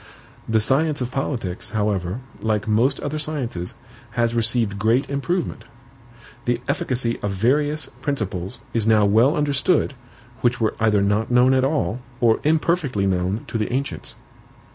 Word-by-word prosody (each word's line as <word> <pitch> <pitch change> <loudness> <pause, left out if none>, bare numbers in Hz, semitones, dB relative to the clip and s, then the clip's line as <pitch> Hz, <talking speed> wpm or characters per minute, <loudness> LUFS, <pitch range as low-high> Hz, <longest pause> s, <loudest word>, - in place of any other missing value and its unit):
The 110 0 +3
science 145 +7 +2
of 125 -1 -3
politics, 115 -10 -3
however, 105 0 -1 0.2
like 110 -2 0
most 120 +6 +2
other 150 +1 -3
sciences, 130 - -4 0.4
has 120 -1 +2
received 115 -3 0
great 115 +7 +2
improvement. 165 +6 -2 0.8
The 120 -1 +1
efficacy 120 -2 0
of 105 - -1
various 145 +10 +1 0.2
principles 100 - -3 0.2
is 115 -2 0
now 110 -2 +5
well 115 +9 +4
understood, 145 +2 +2 0.5
which 125 +1 +1
were 110 -2 +1
either 105 -3 +3
not 105 +2 +1
known 125 +1 +5
at 130 -1 +3
all, 135 -4 0 0.2
or 115 -2 +3
imperfectly 155 - +1
known 95 +3 0
to 115 - -3
the 105 - -1
ancients. 135 +2 -3
120 Hz, 140 wpm, -22 LUFS, 105-140 Hz, 0.8 s, now